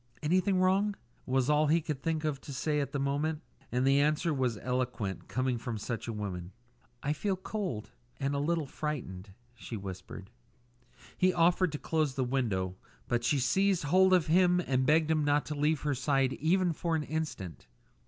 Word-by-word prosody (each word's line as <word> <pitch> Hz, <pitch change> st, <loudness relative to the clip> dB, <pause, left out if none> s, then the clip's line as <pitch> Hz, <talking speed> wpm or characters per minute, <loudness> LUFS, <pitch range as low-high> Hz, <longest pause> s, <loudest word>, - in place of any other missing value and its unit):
"Anything 185 Hz, +4 st, +2 dB
wrong?" 195 Hz, +3 st, +2 dB, 0.3 s
was 130 Hz, -1 st, +2 dB
all 150 Hz, +1 st, +3 dB
he 160 Hz, +3 st, +4 dB
could 150 Hz, -4 st, -4 dB
think 160 Hz, 0 st, -1 dB
of 150 Hz, -3 st, -2 dB
to -, -, -9 dB
say 150 Hz, +2 st, 0 dB
at 140 Hz, -1 st, -2 dB
the 145 Hz, -, -2 dB
moment. 150 Hz, +3 st, -1 dB, 0.3 s
And 125 Hz, +1 st, +1 dB
the 135 Hz, +1 st, +4 dB
answer 150 Hz, +3 st, +2 dB
was 125 Hz, -5 st, 0 dB
eloquent, 125 Hz, -6 st, -2 dB
coming 130 Hz, -1 st, -1 dB
from 115 Hz, -1 st, -4 dB
such 115 Hz, +3 st, -4 dB
a -, -, -2 dB
woman. 95 Hz, -4 st, -5 dB, 0.5 s
"I 145 Hz, -, +1 dB
feel 195 Hz, +5 st, -1 dB
cold 185 Hz, -, -4 dB, 0.3 s
and 140 Hz, 0 st, -1 dB
a 140 Hz, -, 0 dB
little 160 Hz, +1 st, 0 dB
frightened," 125 Hz, -11 st, -5 dB, 0.2 s
she 120 Hz, -1 st, -7 dB
whispered. 95 Hz, +1 st, -8 dB, 0.8 s
He 185 Hz, 0 st, +3 dB
offered 175 Hz, 0 st, +3 dB
to -, -, -2 dB
close 155 Hz, -3 st, 0 dB
the 135 Hz, -, 0 dB
window, 105 Hz, -8 st, -1 dB, 0.3 s
but 120 Hz, -1 st, 0 dB
she 120 Hz, +5 st, +2 dB
seized 190 Hz, +9 st, +2 dB
hold 185 Hz, +6 st, +4 dB
of 180 Hz, -3 st, +4 dB
him 180 Hz, +2 st, +4 dB
and 130 Hz, -6 st, 0 dB
begged 160 Hz, +1 st, +4 dB
him 155 Hz, -1 st, +2 dB
not 145 Hz, 0 st, +2 dB
to 150 Hz, -, -4 dB
leave 150 Hz, 0 st, +1 dB
her 145 Hz, -1 st, 0 dB
side 135 Hz, 0 st, +1 dB
even 175 Hz, +3 st, +2 dB
for 165 Hz, +1 st, -1 dB
an 155 Hz, -, 0 dB
instant. 150 Hz, -, -5 dB
145 Hz, 185 wpm, -31 LUFS, 125-165 Hz, 0.8 s, he